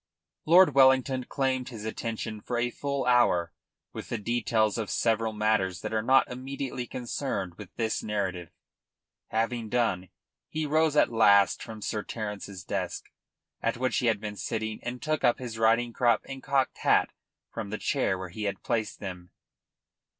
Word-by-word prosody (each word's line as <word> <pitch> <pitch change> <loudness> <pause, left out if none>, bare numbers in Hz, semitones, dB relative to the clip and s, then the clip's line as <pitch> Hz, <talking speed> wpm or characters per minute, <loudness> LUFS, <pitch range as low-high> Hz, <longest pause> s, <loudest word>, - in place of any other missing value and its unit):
Lord 175 -1 +7
Wellington 130 -1 +4
claimed 130 -2 -1
his 110 -4 -8
attention 110 -1 -4
for 120 - -3
a 120 +1 0
full 140 0 -2
hour 120 -9 +3 0.4
with - - -7
the - - -1
details 110 -1 +1
of 110 - -3
several 115 -1 +1
matters 105 -4 0
that - - -4
are 110 - +1
not 130 +4 +4
immediately 130 0 -5
concerned 120 -7 -3
with 100 0 -11
this 110 -2 -1
narrative. 95 -5 -3 0.8
Having 115 0 -1
done, 100 -7 0 0.4
he 155 0 -2
rose 155 +1 +2
at 145 - +4
last 100 -3 +5
from 110 -2 -8
Sir 105 - -2
Terence's 105 -4 -6
desk, - - -4 0.5
at 115 0 0
which 130 0 0
he 120 - +1
had 110 -3 +2
been 105 -1 -6
sitting, 110 0 -3
and 125 +1 -5
took 155 -1 -1
up 120 -2 +4
his 115 -3 -6
riding 115 +1 +3
crop 120 -2 +2
and 135 -1 -7
cocked 135 -1 0
hat - - +3 0.4
from 110 -3 -5
the 110 - -3
chair 120 -9 0
where 90 0 -6
he 105 +4 -5
had 100 - -3
placed 110 -3 -2
them. 90 -3 -7
115 Hz, 165 wpm, -28 LUFS, 105-130 Hz, 0.8 s, Lord